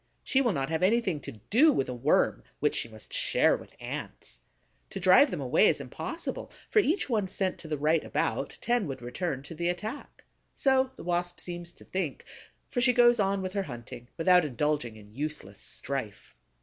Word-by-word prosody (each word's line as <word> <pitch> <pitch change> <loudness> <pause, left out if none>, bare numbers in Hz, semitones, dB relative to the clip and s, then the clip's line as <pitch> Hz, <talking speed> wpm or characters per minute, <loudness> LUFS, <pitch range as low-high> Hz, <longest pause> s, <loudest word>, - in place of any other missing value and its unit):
She 270 - +2
will 240 -4 +2
not 135 -2 -2
have 160 +1 -1
anything 190 -4 +2
to 140 - -8 0.2
do 295 +9 +7
with 135 - 0
a 125 - -3
Worm 120 - +2 0.2
which - - +1
she 115 - -2
must 110 -1 -14
share - - +3
with - - -12
Ants. - - -7 0.5
To - - -6
drive 185 +11 +6
them 175 - -4
away 140 +10 +4
is - - +2
impossible; - - -5 0.2
for 435 - +5
each 370 -1 +1
one 215 -7 0
sent 185 0 -2
to 160 - -9
the 155 -1 -2
right 155 +2 +2
about, - - -2
ten 240 -5 +1
would 135 -3 -6
return 135 +2 -3
to 155 - -9
the 170 +2 -1
attack. 215 +10 -5 0.3
So 265 -1 +3
the - - -10
Wasp 175 0 -1
seems 175 -1 -4
to - - -17
think; 180 -7 -3 0.5
for 245 - 0
she 250 +1 +5
goes 240 -1 +6
on 195 -1 +1
with 185 0 -4
her 200 - 0
hunting, 120 -5 -8
without 180 +1 +5
indulging 145 -3 -1
in 105 -1 -15
useless 140 -8 -4
strife. 130 -7 -5
175 Hz, 195 wpm, -29 LUFS, 135-210 Hz, 0.5 s, do